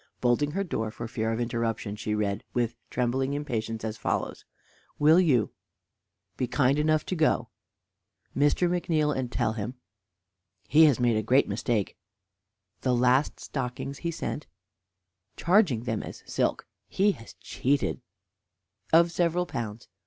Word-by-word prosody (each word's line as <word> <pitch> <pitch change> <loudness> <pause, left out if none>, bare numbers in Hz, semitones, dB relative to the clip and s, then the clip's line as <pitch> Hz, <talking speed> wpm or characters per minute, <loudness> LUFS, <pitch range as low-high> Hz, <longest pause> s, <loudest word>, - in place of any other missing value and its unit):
Bolting 125 +4 +1
her 195 +2 0
door 110 - -2
for 115 +2 -6
fear 110 -1 -2
of 115 - -2
interruption, 115 -3 -2
she 105 0 -2
read, 105 -1 -1
with 120 -1 +1 0.2
trembling 130 +2 0
impatience, 115 -6 -3
as 110 -1 -3
follows: - - -2 0.5
Will 155 +4 +6
you 135 - +3 0.9
be 125 - -1
kind 140 +2 +2
enough 155 0 +2
to 185 - -2
go 160 -2 +1 0.8
to - - -4
Mr. 145 +5 +3
McNeal, 165 -4 +1
and 125 -2 -3
tell 110 - 0
him 110 +3 -4 0.9
he 160 +2 +7
has 145 -5 +4
made 120 -2 +3
a - - +1
great 125 +6 +3
mistake 110 -5 -1 0.8
the 125 -1 +1
last 125 +4 +2
stockings 135 +1 -5
he 170 - -2
sent; 155 -2 -4 0.9
charging 170 - +3
them 110 -3 -2
as - - -9
silk) - - -1 0.2
he 205 +2 +2
has 115 -11 -11
cheated 140 0 -1 0.9
of 170 +1 +5
several 175 +1 +1
pounds. 115 -7 -5
130 Hz, 145 wpm, -27 LUFS, 115-155 Hz, 0.9 s, he